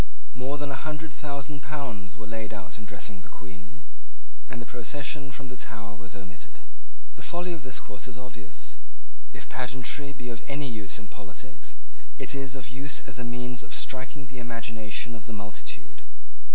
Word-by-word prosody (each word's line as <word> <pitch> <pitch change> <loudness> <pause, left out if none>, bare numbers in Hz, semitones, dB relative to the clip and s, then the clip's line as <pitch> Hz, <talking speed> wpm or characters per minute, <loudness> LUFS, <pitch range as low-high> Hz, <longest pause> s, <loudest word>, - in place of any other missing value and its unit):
More 130 +3 +3
than 145 -1 +3
a 135 - +1
hundred 155 0 +1
thousand 145 0 +1
pounds 125 -10 0
were 110 - -3
laid 110 0 +1
out 100 -1 -3
in 105 - -3
dressing 100 -2 -1
the - - -10
Queen, 95 +8 -7 0.7
and 125 - 0
the 120 - -1
procession 140 +4 +2
from 135 +1 -3
the 125 - -2
Tower 105 -2 -1
was 100 0 -6
omitted. 90 -5 -6 0.6
The - - -6
folly 175 +1 +4
of 165 - -1
this 130 0 +1
course 105 +3 -2
is 120 - -4
obvious. 115 -7 -3 0.5
If - - -3
pageantry 130 +3 +3
be 125 -3 -2
of 115 - -3
any 140 0 +4
use 105 -2 +1
in 105 -2 -5
politics, 105 +6 -5 0.4
it - - +2
is 135 -1 +2
of 125 - -1
use 135 +3 +4
as 125 -2 -2
a - - +2
means 125 0 +2
of - - 0
striking 135 +2 +1
the 130 -1 -4
imagination 115 -1 +2
of 115 -1 -4
the - - 0
multitude. 105 0 -3
125 Hz, 180 wpm, -35 LUFS, 105-140 Hz, 0.7 s, folly